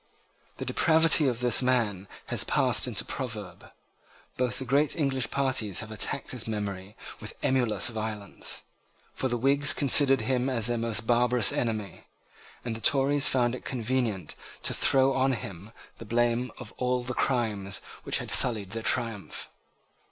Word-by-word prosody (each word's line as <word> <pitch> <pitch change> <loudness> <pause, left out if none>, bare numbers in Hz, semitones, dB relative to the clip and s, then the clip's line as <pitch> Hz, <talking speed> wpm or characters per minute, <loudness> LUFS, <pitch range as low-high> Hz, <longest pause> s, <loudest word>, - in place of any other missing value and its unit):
The - - -5
depravity 160 -2 +4
of 120 -2 -1
this 125 -1 +3
man 115 -7 0 0.2
has - - -2
passed - - +2
into - - -2
a - - -20
proverb. 110 -9 -6 0.7
Both 125 -1 -1
the 130 - -5
great 140 +4 +2
English 135 -5 -1
parties 130 -8 0
have 110 0 -9
attacked 110 +5 -2
his 125 -3 -4
memory 100 -2 -5 0.2
with - - -9
emulous 120 -7 +2
violence: 110 -3 -4 0.5
for 130 - -2
the 120 -1 -1
Whigs 140 +4 +2
considered 135 -2 +4
him 125 +3 0
as 115 -4 +1
their 120 0 +1
most 115 -1 -2
barbarous 120 -1 +2
enemy; 110 -5 -3 0.6
and 115 -2 -3
the 115 - -8
Tories 140 +1 +3
found 120 -2 +2
it 125 - -7
convenient 115 - -2 0.3
to - - 0
throw 135 0 +3
on 135 0 +1
him 100 -3 -8 0.3
the 115 - -9
blame 120 +2 0
of - - -10
all 125 0 0
the 125 +1 -4
crimes 105 -7 0 0.2
which - - 0
had - - 0
sullied 105 -6 +5
their 115 +1 -4
triumph. 115 -5 -3
120 Hz, 160 wpm, -27 LUFS, 110-130 Hz, 0.7 s, sullied